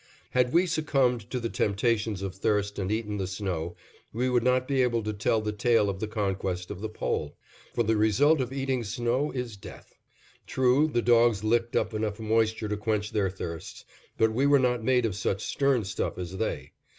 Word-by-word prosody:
Had 125 -1 +2
we 175 +4 +4
succumbed 135 - 0
to 125 - -2
the 115 - -2
temptations 105 -1 0
of 95 -2 -3
thirst 100 +1 -1
and 95 0 -2
eaten 105 -1 -2
the 95 -2 -2
snow, 90 -3 -3 0.4
we 125 +3 -1
would 120 -1 +3
not 125 +1 +2
be 135 -2 +2
able 120 -3 +1
to 105 0 -2
tell 110 +1 +1
the 105 0 -2
tale 105 -1 +2
of 95 - -8
the 110 - -2
conquest 95 -4 -2
of 100 -1 -7
the 110 - -3
Pole; 75 -8 -3 0.4
for 120 - +2
the 110 0 +1
result 120 +9 +3
of 125 0 -3
eating 135 -2 -1
snow 120 +6 -1
is 125 -5 -5
death. 95 - -12 0.5
True, 130 +3 +3
the 120 -6 0
dogs 115 -3 +4
licked 115 +2 +1
up 110 +1 0
enough 110 0 -2
moisture 110 0 +1
to 105 0 -2
quench 105 -1 -1
their 100 -3 +1
thirsts, 85 -3 -7 0.3
but 110 0 +3
we 135 +5 +2
were 140 0 +6
not 125 -3 +1
made 125 0 +3
of 105 -5 -1
such 100 0 -2
stern 135 -4 +1
stuff 95 - -3
as 90 +1 -5
they. 110 - -3
110 Hz, 200 wpm, -27 LUFS, 100-125 Hz, 0.5 s, were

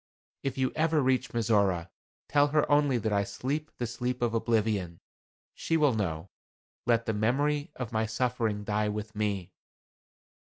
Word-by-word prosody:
If 135 -1 -3
you 130 -1 +1
ever 160 0 +2
reach 130 -2 +2
Mizora, 100 -7 +1 0.4
tell 145 0 +4
her 150 0 +1
only 145 -3 +4
that 110 -1 -1
I 100 0 +2
sleep 145 +9 -3
the 120 - -2
sleep 125 +1 -3
of 115 -1 +1
oblivion. 110 -7 0 0.5
She 165 - 0
will 145 -4 +4
know. 90 -5 -3 0.6
Let 115 -1 +3
the 110 - 0
memory 145 - +1
of 125 -2 -5
my 110 -1 0
suffering 115 -2 -1
die 105 +1 0
with 105 +1 -5
me." 100 -4 -2
115 Hz, 155 wpm, -29 LUFS, 105-135 Hz, 0.6 s, tell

